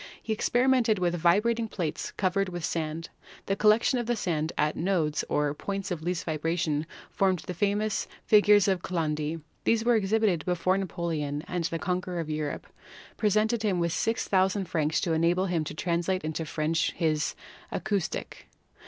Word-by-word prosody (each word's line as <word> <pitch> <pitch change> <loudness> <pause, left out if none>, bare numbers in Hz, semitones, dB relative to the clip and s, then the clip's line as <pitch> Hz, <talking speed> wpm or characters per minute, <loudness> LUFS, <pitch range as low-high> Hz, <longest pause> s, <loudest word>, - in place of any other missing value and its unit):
He 220 - -1
experimented 245 0 +2
with 175 -2 +1
vibrating 210 +7 +2
plates 170 -8 -3
covered 195 0 0
with 175 -3 -4
sand. 160 0 -3 0.4
The 195 - 0
collection 215 +5 +4
of 240 - -3
the 240 - +1
sand 160 -6 -1
at 150 +1 +2
the - - -5
nodes, 165 -5 +1
or 145 -1 +1
points 195 +5 -4
of 170 -3 -2
least 175 +1 -2
vibration, 160 -1 -1 0.2
formed 190 -3 +1
the 180 - -4
famous 205 +3 0 0.2
"figures 205 -1 +6
of 190 -3 +1
Chladni." 155 -3 -2 0.2
These 230 0 +2
were 240 - +5
exhibited 210 -4 +2
before 180 +1 +1
Napoleon, 160 -6 -2
and 175 -2 -2
the 165 - -1
conqueror 180 0 -2
of 160 -2 -3
Europe 150 -1 -3 0.5
presented 215 +2 +2
him 205 -4 +1
with 170 -1 0
6,000 195 -3 +1
francs 155 -2 0
to 165 - 0
enable 170 +3 +2
him 175 -4 0
to - - -6
translate 175 +3 -1
into 155 +1 -3
French 155 +2 0
his 155 -3 0 0.4
Akustik. 200 -5 -3
180 Hz, 160 wpm, -28 LUFS, 160-205 Hz, 0.5 s, figures